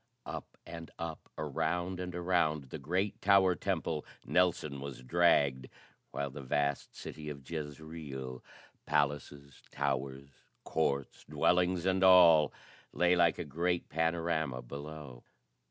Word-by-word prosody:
Up 80 0 -7
and 85 -1 -8
up, 85 -1 -6
around 90 +5 -1
and 90 -1 -5
around 85 -6 0
the - - -5
great 95 +5 -1
tower 95 -2 +5
temple, 80 -2 -2 0.2
Nelson 85 -6 +1
was 70 -2 -7
dragged, 70 -4 +3 0.4
while 70 -1 -3
the 70 - -8
vast 70 +1 -1
city 75 -1 -7
of 70 -3 -9
Jezreel, 75 -4 -6 0.4
palaces, 70 -1 -1
towers, 70 0 -2 0.3
courts, 70 -4 -1
dwellings 90 0 +2
and 95 0 +2
all, 85 -5 +7 0.4
lay 90 0 +3
like 85 -2 +4
a 85 - -4
great 85 +4 -1
panorama 80 -5 0
below. 70 -1 -8
80 Hz, 120 wpm, -32 LUFS, 70-85 Hz, 0.4 s, all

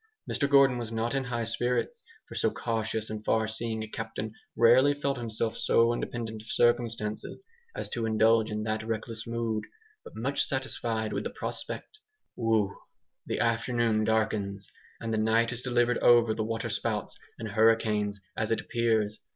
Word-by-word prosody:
Mr 140 - 0
Gordon 135 -3 +5
was 115 -2 -5
not 115 +2 -1
in 135 -1 0
high 120 -1 -2
spirits, 125 - -1 0.3
for - - -10
so - - +2
cautious 110 -1 -2
and 110 0 -5
far 110 0 +2
seeing 110 0 -3
a - - -6
captain 110 0 -5 0.2
rarely 130 +5 +6
felt 140 -1 -1
himself 115 -1 -1
so 115 0 +3
independent 115 -2 -4
of 110 - -15
circumstances 115 - 0 0.3
as - - -4
to 115 -2 -1
indulge 110 0 +4
in 105 0 -3
that 110 0 -1
reckless 115 0 -4
mood 115 -2 -1 0.4
but - - -12
much 130 +6 0
satisfied 115 -5 -2
with - - -2
the - - -2
prospect. 430 - -5 0.4
Whew! 110 -4 +1 0.5
The - - -2
afternoon 115 -1 +1
darkens, 105 -3 0 0.3
and 115 -1 -3
the 110 - +1
night 115 +2 +2
is 120 - -3
delivered 120 -1 +2
over 120 -2 +5
to 110 - -3
water 115 +1 -3
spouts - - -2 0.2
and 110 -1 -5
hurricanes, 105 -1 +2 0.2
as 110 - -1
it 115 - +1
appears. 110 -3 0
115 Hz, 165 wpm, -29 LUFS, 110-120 Hz, 0.5 s, rarely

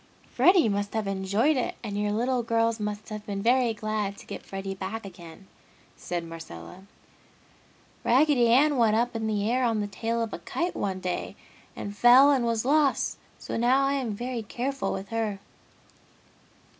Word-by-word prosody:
"Freddy 360 - +5
must 205 0 -2
have 220 -1 -1
enjoyed 195 +9 +1
it 255 - -2
and 210 -3 -4
your 205 0 0
little 245 +4 0
girls 230 0 0
must 210 0 -4
have 215 -1 -6
been 200 -1 -3
very 245 0 +3
glad 215 -2 -3
to - - -13
get - - -7
Freddy 195 0 -5
back 195 +3 -6
again!" 175 0 -12 0.5
said 175 -1 -4
Marcella. 165 - -10 1.2
"Raggedy 260 -1 +4
Ann 275 +5 +4
went 225 -3 +3
up 240 +2 0
in 220 -1 -2
the 210 -1 0
air 250 +3 +1
on 225 -3 +1
the 205 - -1
tail 230 +3 -2
of 225 - -5
a - - -5
kite 340 - -3
one 190 -2 -3
day 180 -1 -3 0.4
and 205 0 -6
fell 250 +6 +7
and 265 -4 +2
was 230 0 0
lost, 290 0 +2 0.2
so - - -5
now 255 +4 +3
I 275 - +1
am 250 -7 -2
very 245 +2 -4
careful 245 +1 -3
with 195 +1 -5
her!" 225 -3 -2
225 Hz, 175 wpm, -27 LUFS, 200-245 Hz, 1.2 s, fell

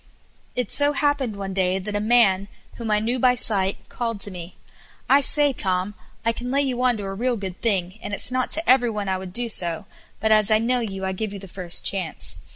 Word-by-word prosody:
It 250 -4 -2
so 290 0 +3
happened 285 -6 0
one 195 -1 -5
day 185 -1 +1
that 205 +2 -5
a - - +1
man, 210 -3 +3 0.3
whom 230 -2 -5
I 210 - +3
knew 235 +4 -1
by 250 0 +4
sight, 200 -5 -1
called 230 -3 -4
to 205 - -3
me: 180 -1 -9 0.5
"I 280 +1 +5
say, 290 0 +3
Tom, 185 -2 0 0.3
I 230 - +3
can 245 +2 -6
lay 280 +2 +2
you 255 -3 -2
on 250 -2 +2
to 205 - -6
a 195 0 -4
real 240 +4 -1
good 190 -3 -7
thing, 195 -3 -1
and - - -6
it's 205 - 0
not 255 0 -1
to 325 +2 0
every 250 -1 +5
one 210 -2 -4
I 190 -1 -1
would 185 -1 -8
do 240 +5 +2
so, 175 -3 +2 0.3
but 220 +1 +1
as 215 -2 +5
I 215 - +5
know 245 +3 +1
you 195 -5 -4
I 190 - -1
give 205 +2 -4
you - - -6
the 195 0 -10
first 180 -1 -1
chance. 160 - -1
210 Hz, 240 wpm, -23 LUFS, 190-245 Hz, 0.5 s, I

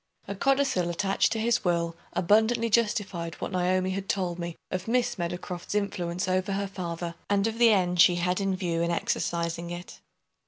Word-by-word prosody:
A 200 - -3
codicil 270 -6 +1
attached 195 +3 +1
to 225 - -2
his 230 +1 +1
will 170 -2 0 0.2
abundantly 220 +5 +3
justified 205 -7 0
what - - -5
Naomi 185 0 +1
had 195 +1 -4
told 180 -3 -1
me 170 -1 -4 0.2
of 185 +2 -3
Miss 240 -3 +1
Meadowcroft's 175 +2 -4
influence 180 -3 -1
over 185 +2 0
her 200 +1 -1
father, 175 -3 -5 0.2
and 200 0 +2
of 225 +1 -2
the 235 -1 +7
end 180 -4 +3
she 175 - +6
had 180 +2 0
in 195 -1 0
view 170 -3 -1
in 170 - +1
exercising 170 0 -1
it. 175 +1 -8
185 Hz, 180 wpm, -27 LUFS, 175-205 Hz, 0.2 s, the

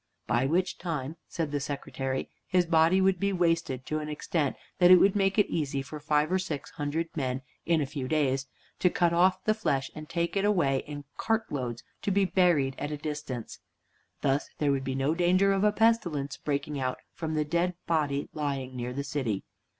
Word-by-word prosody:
By 120 +3 +2
which 180 +5 0
time, 160 -3 -3
said 160 -4 -3
the 145 - 0
Secretary, 135 -2 -3 0.2
his 180 -1 +3
body 165 +2 +4
would 190 -1 +3
be 200 +2 +1
wasted 165 -8 0
to 155 - -1
an 150 0 -5
extent 150 -1 -1 0.2
that 180 -1 +7
would 195 0 +4
make 195 0 +2
it 210 - +5
easy 140 -4 -2
for 150 +2 -8
five 150 +2 +1
or 190 - +3
six 160 -7 -4
hundred 160 +2 -3
men, 130 -3 -2 0.2
in 165 -2 +3
a - - +1
few 135 -1 -5
days, 135 -3 +1 0.3
to 180 - +4
cut 170 -1 +2
off 185 +2 +3
the 215 - +3
flesh 140 - -1
and 155 0 -9
take 170 +2 -1
it 195 - +1
away 170 -10 +3
in 145 -1 -7
cart 225 0 0
loads 120 -4 -3 0.2
to - - -1
be 200 0 +3
buried 175 -8 +3
at 145 - -3
a 150 - -3
distance. 145 -5 -5 0.6
Thus 140 +1 +1
there 145 -2 +2
would 135 -1 0
be 130 0 -2
no 135 +3 +1
danger 180 +3 +3
of 195 0 +1
a 210 - +5
pestilence 205 -11 +1
breaking 145 0 -2
out 130 -1 -1 0.2
from 160 -1 -3
the 150 -1 +1
dead 170 +3 0
body 145 -4 0
lying 135 -4 -3
near 125 0 -3
the 140 +2 -3
city. 130 -8 -2
150 Hz, 200 wpm, -29 LUFS, 140-180 Hz, 0.6 s, that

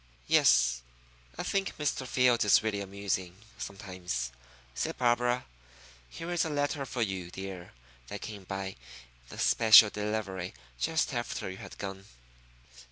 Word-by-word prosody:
"Yes, - - +4 0.6
I - - -3
think 195 -1 -1
Mr. 140 -3 -1
Fields 125 -2 +3
is 105 +1 +5
really 105 -2 -1
amusing 95 -2 -3 0.2
sometimes," 90 - -4 0.4
said - - -3
Barbara. 120 0 +2 0.6
"Here 165 - -6
is 175 - +2
a 160 - -2
letter 145 -1 -1
for 120 -2 -1
you, 95 -4 -3
dear, 95 -1 -8 0.3
that - - -6
came 100 -3 -7
by 95 0 -5 0.6
special 110 -2 +7
delivery 105 - -3 0.2
just 160 -2 +1
after 120 -5 -3
you 95 - -8
had - - -10
gone." 95 -1 -6
100 Hz, 130 wpm, -30 LUFS, 95-125 Hz, 0.6 s, special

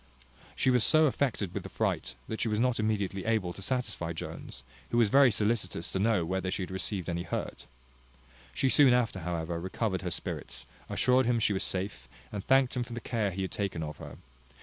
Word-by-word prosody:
She 130 - +2
was 125 -3 +4
so 155 0 +6
affected 125 - 0
with - - -3
the - - -9
fright, 65 - -2
that 110 - -4
she - - +1
was 105 -1 0
not 125 0 +2
immediately 100 -3 -1
able 110 -6 0
to 100 - -10
satisfy 95 -8 -2
Jones, 80 - -8 0.3
who 120 - 0
was 115 -3 +4
very 135 +2 +7
solicitous 105 -5 -1
to 95 - -1
know 105 -4 +2
whether 95 +1 -2
she 95 - -2
had 90 - -7
received 95 -1 -2
any 85 -1 -2
hurt. - - -5 0.8
She 135 - 0
soon 135 -1 +6
after, 115 -6 0
however, 85 -1 -3
recovered 95 +2 -2
her 90 - -3
spirits, - - -5 0.2
assured 130 0 +3
him 120 -1 +3
she 105 - +2
was 95 - -1
safe, 95 +2 -2 0.2
and 100 -2 -4
thanked 135 -1 +3
him 125 - 0
for 120 - -9
the 120 - -4
care 115 -3 -1
he 95 +1 -3
had 95 - -4
taken 95 -5 -2
of 75 -1 -6
her. - - -9
105 Hz, 210 wpm, -30 LUFS, 95-120 Hz, 0.8 s, very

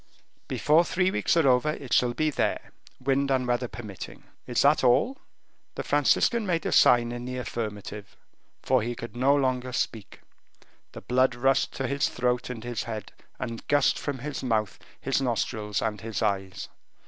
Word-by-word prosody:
"Before 155 +3 +3
three 185 +1 +1
weeks 170 - +1
are 160 -4 +4
over 125 +3 +3
it 135 -4 -6
shall 120 -1 +3
be 155 0 +1
there, - - -2 0.3
wind 140 0 +1
and 130 -2 +1
weather 120 0 0
permitting. 105 -5 -9 0.2
Is 120 - +1
that 145 +1 +4
all?" 135 - +3 0.6
The - - -4
Franciscan 235 -2 +2
made 170 -5 -1
a - - -1
sign 120 -1 +5
in 120 0 -6
the 125 0 -4
affirmative, 105 -4 -6 0.5
for 130 -2 +3
he 120 +2 -3
could 120 -1 -8
no 135 +3 +3
longer 130 -2 0
speak; 115 -4 -4 0.7
the - - -8
blood 130 0 +2
rushed 135 +2 +1
to 135 - -3
his 140 +1 0
throat 125 0 -1
and 115 -3 -6
his 120 -3 -4
head, 110 -3 -6 0.3
and 115 -1 -6
gushed 145 -1 +3
from 145 -2 -3
his 145 +3 -5
mouth, 110 -6 -1 0.2
his 135 +1 0
nostrils, 110 -4 -1
and 105 -3 -2
his 110 -2 -3
eyes. 95 -3 -2
125 Hz, 170 wpm, -27 LUFS, 115-135 Hz, 0.7 s, sign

